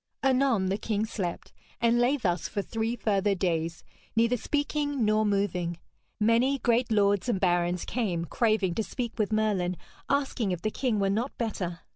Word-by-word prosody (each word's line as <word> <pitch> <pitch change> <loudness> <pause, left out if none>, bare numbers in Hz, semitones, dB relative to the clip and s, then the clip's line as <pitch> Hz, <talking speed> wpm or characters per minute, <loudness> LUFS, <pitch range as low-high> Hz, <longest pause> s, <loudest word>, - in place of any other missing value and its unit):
Anon 260 -7 +3
the 195 +2 -1
king 215 -1 -1
slept, 190 -6 -4 0.3
and 235 0 +3
lay 250 +4 +3
thus 180 - -1
for 200 - -3
three 225 +3 -2
further 205 -3 +1
days, 165 -3 -1 0.3
neither 230 +2 +3
speaking 290 0 -1
nor 215 0 +3
moving. 180 -4 0 0.4
Many 230 +6 +3
great 240 -1 +1
lords 205 +1 +2
and 210 -6 +1
barons 175 -1 +1
came 185 -9 -1
craving 215 -2 +1
to 220 - -1
speak 235 0 -5
with 215 0 +1
Merlin, 200 -5 +1 0.3
asking 270 -8 0
if 175 - -6
the 215 - 0
king 245 -3 0
were 195 -1 +2
not 235 +7 -2
better. 180 -7 -3
215 Hz, 165 wpm, -28 LUFS, 185-240 Hz, 0.4 s, Anon